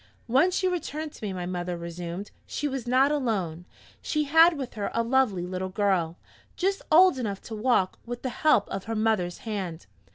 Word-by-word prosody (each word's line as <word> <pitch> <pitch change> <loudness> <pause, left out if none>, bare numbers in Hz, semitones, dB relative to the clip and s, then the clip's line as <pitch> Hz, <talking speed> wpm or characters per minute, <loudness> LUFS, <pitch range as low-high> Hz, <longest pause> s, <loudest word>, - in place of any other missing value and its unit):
"When 265 +9 +4
she 370 +1 0
returned 315 -4 -3
to - - -13
me," 205 - -2
my 180 -1 -4
mother 175 -1 -3
resumed, 170 +3 -6 0.2
"she 295 - -2
was 265 -4 -4
not 260 +3 +4
alone. 195 - -1 0.4
She 305 -1 0
had 325 +3 +6
with 265 -3 -5
her 205 -2 -3
a 230 - +2
lovely 230 -7 +2
little 185 +1 -4
girl, 185 -4 0 0.4
just 390 +2 0
old 350 -3 +6
enough 205 -5 -3
to 225 - -7
walk 215 -4 +1
with 240 0 -7
the 260 - -1
help 245 -5 +3
of 195 - -4
her 225 +1 -3
mother's 215 -5 +1
hand. 190 -7 -4
225 Hz, 190 wpm, -27 LUFS, 185-275 Hz, 0.4 s, had